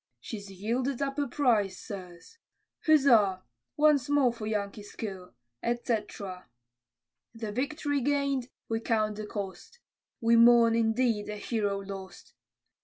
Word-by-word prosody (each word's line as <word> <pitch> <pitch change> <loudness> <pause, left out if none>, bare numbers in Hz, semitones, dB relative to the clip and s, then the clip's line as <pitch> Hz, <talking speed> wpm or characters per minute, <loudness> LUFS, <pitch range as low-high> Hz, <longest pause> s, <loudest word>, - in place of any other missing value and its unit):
She's 205 -3 -7
yielded 235 +7 -2
up 275 0 -2
a 285 - 0
prize, 220 -9 +1
sirs. 190 - -10 0.5
Huzza! 230 -11 +5 0.3
once 295 -3 +4
more 280 -4 +3
for 225 -3 -6
Yankee 210 -1 -2
skill, 195 -3 -8 0.3
etc. 210 - -3 0.9
The 225 -2 -5
victory 285 +4 -1
gain'd, 280 -2 0 0.2
we 225 0 -1
count 215 -2 0
the 215 0 -5
cost, 200 - -6 0.4
We 230 0 +4
mourn, 235 0 +7
indeed, 225 -1 +1
a 210 - -4
hero 205 -2 -1
lost! 195 -1 -9
225 Hz, 120 wpm, -29 LUFS, 205-260 Hz, 0.9 s, mourn